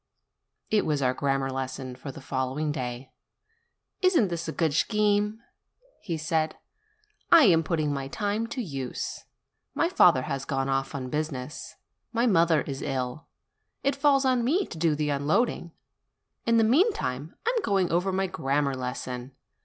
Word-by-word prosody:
It 215 -1 +3
was 145 -3 0
our 125 0 +2
grammar 135 0 0
lesson 130 -1 -4
for 130 +2 -7
the 150 - -11
following 135 +3 -2
day. 125 -2 -5 0.9
"Isn't 345 - +4
this 170 -1 -4
a - - -2
good 160 -3 0
scheme?" 210 +4 +1 0.6
he 170 -6 -3
said. 155 0 0 0.8
"I 335 -2 +9
am 170 -8 +6
putting 155 -3 -1
my 135 -1 -3
time 210 +8 -2
to 250 +1 -4
use. 135 - -5 0.5
My - - +2
father - - +5
has 135 - -3
gone 135 0 -1
off 135 +1 -1
on 130 -2 -5
business. 150 -3 -4 0.4
My 235 +1 +1
mother 165 - +4
is 135 -2 -5
ill. 130 +1 -3 0.6
It 275 - +1
falls 280 -1 +3
to 260 -1 +3
me 280 +11 +1
to - - -9
do 160 -2 +2
the 150 0 -1
unloading. 165 - 0 0.8
In 230 0 +4
the 225 - +5
meantime, 220 - +1
I 475 - +2
am 465 - +1
going 195 - +1
over 180 +3 +1
my 190 +1 0
grammar 145 -6 0
lesson. 125 0 -5
155 Hz, 160 wpm, -27 LUFS, 135-210 Hz, 0.9 s, I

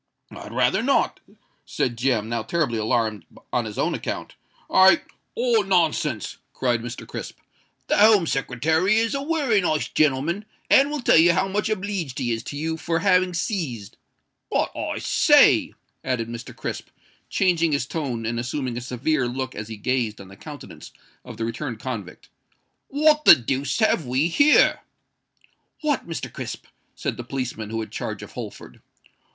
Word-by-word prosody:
"I'd - - -9
rather - - +2
not," - - +1 0.4
said 120 - -2
Jem, 120 -3 0
now 115 0 -2
terribly 120 0 -1
alarmed 110 -3 0 0.3
on - - +1
his - - -7
own - - 0
account: - - -5 0.3
"I——" 190 -2 +6 0.4
"Oh! 235 -2 +3
nonsense," 160 - 0 0.2
cried 120 -3 0
Mr. 120 0 -7
Crisp. - - -7 0.5
"The - - +1
Home 210 -4 +6
Secretary 160 - +1
is 225 0 +1
a 275 - -1
wery 280 -9 +1
nice 155 -4 0
genelman, 155 +7 +1 0.3
and 275 +1 +6
will 300 -2 -3
tell - - +5
you 170 +1 +6
how 190 +2 +1
much 210 +3 -1
obleeged 195 -9 -3
he 120 - -1
is 115 -1 -2
to 145 - -6
you 160 +2 -2
for 165 +1 -1
having 180 0 +2
seized——But, 155 - -4
I - - -3
say," - - +4 0.3
added 120 -3 -2
Mr. 120 0 -8
Crisp, - - -5 0.4
changing 170 -4 +2
his 140 -3 0
tone 130 -7 -4
and 115 +1 -2
assuming 125 0 -3
a - - -4
severe 125 +2 -1
look 130 +1 -4
as 110 - -6
he 110 -1 -7
gazed 115 -1 -1
on 95 -1 -11
the 95 - -13
countenance 145 +7 -11 0.3
of 125 -3 -10
the 115 - -2
returned 115 0 -4
convict, 110 -8 -6 0.6
"what 300 +1 +3
the - - +11
deuce 135 +3 -2
have 195 - +2
we 130 +7 +1
here?" 290 - +5 1.0
"What, 295 - -1
Mr. 165 - -5
Crisp?" - - -6 0.3
said - - -3
the 120 - -5
policeman, 125 -4 -4
who 115 0 -3
had 110 - -7
charge - - -5
of - - -11
Holford. - - -9
140 Hz, 165 wpm, -23 LUFS, 120-185 Hz, 1.0 s, the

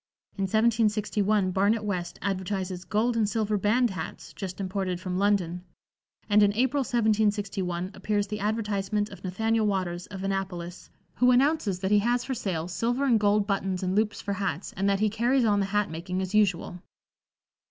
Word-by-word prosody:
In 195 - -1
1761 215 -2 +2
Barnet 205 +4 +2
West 185 -4 -3
advertises 190 -1 -3
"gold 230 +3 +1
and 220 -3 +2
silver 215 -1 0
band 215 +4 +2
hats, 165 -4 -7
just 185 -1 -6
imported 190 -2 -2
from 185 0 -3
London," 185 -4 +1 0.6
and 210 0 +5
in 205 -1 +5
April, 260 +4 +2
1761, 205 -7 0
appears 205 -1 -1
the 210 +1 -5
advertisement 210 -1 -1
of 200 - -12
Nathaniel 220 +4 0
Waters, 180 -3 -2
of 195 -1 -7
Annapolis, 185 -3 -4 0.3
who 250 +2 +4
announces 250 - +3
that 190 +1 -1
he 210 - +6
has 240 +3 +1
for 265 - -2
sale 185 -9 -3
"silver 235 +10 -1
and 235 -5 +4
gold 205 0 +3
buttons 195 -2 -1
and 185 0 0
loops 210 0 0
for 200 - -2
hats, 195 -3 -3
and 195 +1 0
that 200 0 +1
he 215 - +4
carries 240 +4 +2
on 205 -2 +3
the 195 - 0
hat 205 -3 0
making 180 +3 -4
as 190 +1 -3
usual." 190 -4 +1
205 Hz, 175 wpm, -27 LUFS, 190-215 Hz, 0.6 s, he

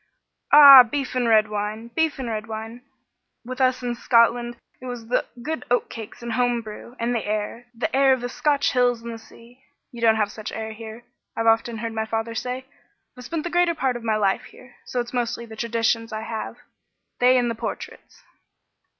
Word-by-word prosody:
"Ah! 280 -3 +11
Beef 260 +3 -2
and 250 -2 0
red 215 -1 +4
wine! 210 +2 -4
Beef 320 +5 0
and 260 -2 -5
red 220 -1 -4
wine! 225 +2 -7 0.6
With 255 +2 -5
us 255 -1 +2
in 245 -1 -1
Scotland 240 0 +2 0.2
it 255 - -8
was 245 -2 -6 0.4
good 315 +3 -4
oatcakes 235 -2 -3
and 235 -1 -4
home 245 0 0
brew 220 +3 -10
and 235 +1 -1
the 230 - -1
air. 215 +3 -4
The 230 - -2
air 270 0 +5
of 260 -2 +2
the 245 - -3
Scotch 280 +2 0
hills 245 -2 +1
and 235 0 -6
the 225 - -8
sea. 240 +3 -18 0.3
You 235 - -10
don't 225 -1 +4
have 210 -2 0
such 215 -1 -7
air 220 0 -5
here, 220 +1 -10 0.3
I've 225 - -1
often 225 +1 +2
heard 225 +1 -4
my 220 0 -3
father 225 +1 -3
say. 250 +3 -4 0.5
I've 250 -1 -11
spent 325 +2 -3
the 345 - -4
greater 350 -1 +2
part 265 -4 -1
of 240 - -7
my 220 -1 0
life 200 -2 0
here, 250 -1 -17
so 250 - -3
it's 240 +1 -9
mostly 235 -1 -2
the 220 -1 -11
traditions 230 0 -1
I 215 0 -4
have 225 0 -5 0.6
they 250 +1 +5
and 240 -1 +1
the - - -2
portraits." 230 - -8
235 Hz, 200 wpm, -23 LUFS, 225-250 Hz, 0.6 s, Ah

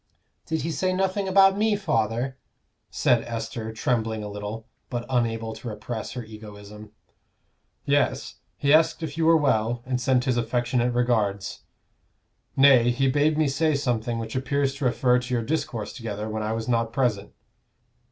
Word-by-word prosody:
"Did 160 0 -2
he 165 - -2
say 185 +3 0
nothing 190 +1 0
about 195 0 +5
me, 215 0 +3
father?" 120 - -1 0.5
said 120 -2 +2
Esther, 115 -1 -5
trembling 110 -1 -1
a 105 - -5
little, 105 +2 -6 0.2
but 120 -1 -3
unable 115 -2 0
to 120 - -9
repress 110 +1 -5
her 125 -1 -5
egoism. 105 -1 -11 0.9
"Yes; - - 0 0.2
he 140 0 +2
asked 160 +1 +3
if 150 -2 -4
you 165 0 +1
were 165 0 +6
well, 120 -5 +1
and 125 -1 -2
sent 130 -1 +2
his 125 -3 +1
affectionate 120 +1 0
regards. 110 -5 0 0.9
Nay, 135 -3 +6
he 135 +3 +1
bade 150 +2 +2
me 155 -1 +3
say 155 +2 +1
something 120 -4 -1
which 115 0 -5
appears 135 +1 0
to 140 -1 -4
refer 125 0 +3
to 125 0 -5
your 115 - 0
discourse 120 -6 -3
together 110 -4 -5
when 110 0 -3
I 110 +1 -2
was 115 0 -4
not 115 -2 +1
present. 115 -5 -1
120 Hz, 160 wpm, -25 LUFS, 110-140 Hz, 0.9 s, were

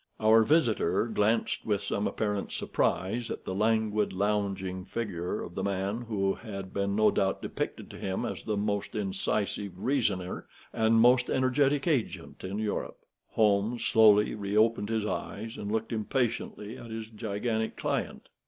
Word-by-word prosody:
Our 110 +1 +6
visitor 110 - +2
glanced 110 0 +1
with 100 -2 0
some 100 +1 -1
apparent 105 -2 -2
surprise 115 +5 -1
at - - -6
the 95 - -3
languid, 110 0 +1
lounging 95 -2 -1
figure 90 -5 -3
of 85 - -8
the 95 - -3
man 100 +3 -1
who 95 -3 +1
had 100 -4 -8
been, 100 0 0
no 105 0 +5
doubt, 95 -1 0
depicted - - -4
to - - -10
him 95 +4 -2
as - - -4
the 105 -2 -1
most 100 0 -2
incisive 100 0 -2
reasoner 100 -9 -1 0.3
and 110 0 +3
most 125 +2 +5
energetic 135 +2 +2
agent 140 -9 -1
in 95 +2 -4
Europe. 110 -1 -2 0.4
Holmes 105 +2 +2
slowly 105 -1 +5
reopened 105 +1 +1
his 110 -2 0
eyes 110 +1 -4
and 100 0 -5
looked 110 +1 -1
impatiently 115 -1 -2
at 120 - -10
his 110 0 -5
gigantic 110 +1 -2
client. - - -2
105 Hz, 150 wpm, -29 LUFS, 100-115 Hz, 0.4 s, Our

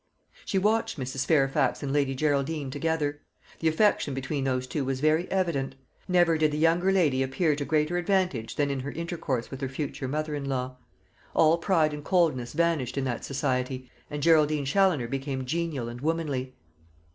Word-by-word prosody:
She 195 - -1
watched 215 -3 +1
Mrs. 130 +1 -3
Fairfax 135 -3 +2
and 140 -1 -2
Lady 140 -2 +1
Geraldine 145 0 0
together. 145 0 -1 0.4
The 165 - 0
affection 160 -4 +2
between 135 +1 -2
those 130 -1 0
two 140 +2 -2
was 130 0 -2
very 155 +4 +2
evident. 165 -9 -1 0.3
Never 175 -3 +3
did 155 -1 +4
the 150 - -2
younger 170 +4 +3
lady 155 -9 +2
appear 145 +4 +1
to 145 0 -3
greater 155 +3 +1
advantage 175 - 0
than 145 -1 +1
in 135 - -2
her 135 +2 -4
intercourse 165 -7 -3
with 135 0 -7
her 135 - -2
future 135 -1 -4
mother 155 +3 -2
in 145 -1 -3
law. 130 -1 -3 0.6
All 160 +1 +5
pride 160 -4 +2
and 150 0 -6
coldness 150 -9 +1
vanished 165 -6 0
in 135 - 0
that 125 -3 -3
society, 130 -2 -2 0.2
and 145 -1 -4
Geraldine 155 -3 +4
Challoner 155 -4 +2
became 135 0 -3
genial 155 -4 -2
and 120 +1 -7
womanly. 145 -5 -2
145 Hz, 175 wpm, -27 LUFS, 135-165 Hz, 0.6 s, All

